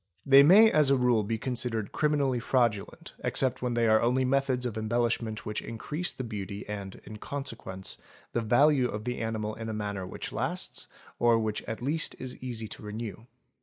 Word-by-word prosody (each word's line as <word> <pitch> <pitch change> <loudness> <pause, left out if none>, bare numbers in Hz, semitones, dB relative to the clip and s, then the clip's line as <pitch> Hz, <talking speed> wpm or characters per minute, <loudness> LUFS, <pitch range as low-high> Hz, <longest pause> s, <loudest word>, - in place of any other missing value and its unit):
They 140 0 +8
may 205 +9 +8
as 150 -3 +5
a 140 - +4
rule 125 -3 +3
be 110 +2 -2
considered 115 -3 -3
criminally 145 -4 +1
fraudulent 115 -4 0
except 130 -1 0
when 125 -1 -1
they 115 -1 +3
are 110 0 +5
only 125 +2 +2
methods 130 -1 +1
of 120 -4 -3
embellishment 115 0 -1
which 105 - -3
increase 150 +10 -4
the 130 - -6
beauty 100 -3 -6
and, 100 -2 -6
in 110 - -8
consequence, 110 -8 -6 0.3
the 120 - +1
value 130 +4 +4
of 105 +1 -5
the 125 +1 -3
animal 110 -1 -2
in 115 0 -6
a - - -3
manner 100 -3 -3
which - - -6
lasts - - -3 0.3
or 120 -1 +5
which 110 -1 -1
at 115 +2 -5
least 155 +4 0
is 130 -1 -6
easy 120 -3 -5
to - - -8
renew. 110 0 -6
115 Hz, 185 wpm, -29 LUFS, 110-130 Hz, 0.3 s, They